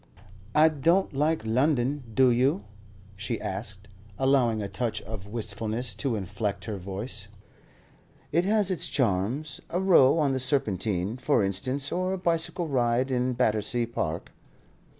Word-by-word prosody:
"I 155 +1 +7
don't 165 +6 +1
like 150 -2 0
London, 130 +3 +1
do 130 +2 +4
you?" 125 -3 +2 0.5
she 110 +4 -3
asked, 100 0 -5 0.3
allowing 130 -4 +2
a 100 - -3
touch 105 +4 -2
of 105 -3 -8
wistfulness 110 +1 -2
to 115 +4 -2
inflect 100 0 -3
her 110 -3 -4
voice. 100 +3 -4 1.0
"It 170 - +2
has 205 -1 +2
its 180 - 0
charms. 125 +6 -1
A 175 - -1
row 170 -7 +5
on 145 -4 +2
the 130 - -1
Serpentine, 105 - 0
for 130 -3 +2
instance, 130 +9 -1
or 185 +1 -1
a - - -2
bicycle 170 0 0
ride 125 -1 +1
in 125 0 +1
Battersea 115 0 +1
Park." 85 -9 -4
120 Hz, 140 wpm, -27 LUFS, 105-145 Hz, 1.0 s, I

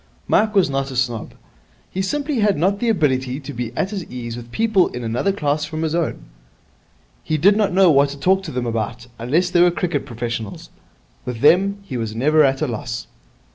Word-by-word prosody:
Mike 215 0 +2
was 195 -3 +5
not 135 -1 -2
a 130 - -7
snob. 120 -3 -2 0.6
He 190 - -2
simply 285 +6 -1
had 205 -2 +2
not 195 +6 +1
the 235 - 0
ability 135 - +1
to 140 +1 -8
be 120 -2 -4
at 195 - 0
his 195 -4 -4
ease 120 -2 -6
with 120 0 -10
people 220 - +2
in 125 - -6
another 120 +12 0
class 150 -5 -1
from 155 +1 -4
his 160 -1 -1
own. 170 -2 -2 1.0
He 155 - -1
did 195 +7 +5
not 210 -2 +2
know 185 -1 +5
what 140 0 +4
to 140 - -7
talk 190 +6 +3
to 155 - -5
them 125 -1 -2
about, 115 +1 -3
unless 160 +10 +1
they 175 -1 +4
were 175 - +6
cricket 170 -4 -2
professionals. 115 -3 -5 0.5
With 125 -2 -5
them 195 +7 +4
he 135 -10 -5
was 110 -2 -4
never 150 +6 +4
at 135 +1 +2
a - - 0
loss. 115 0 -4
150 Hz, 210 wpm, -20 LUFS, 125-190 Hz, 1.0 s, were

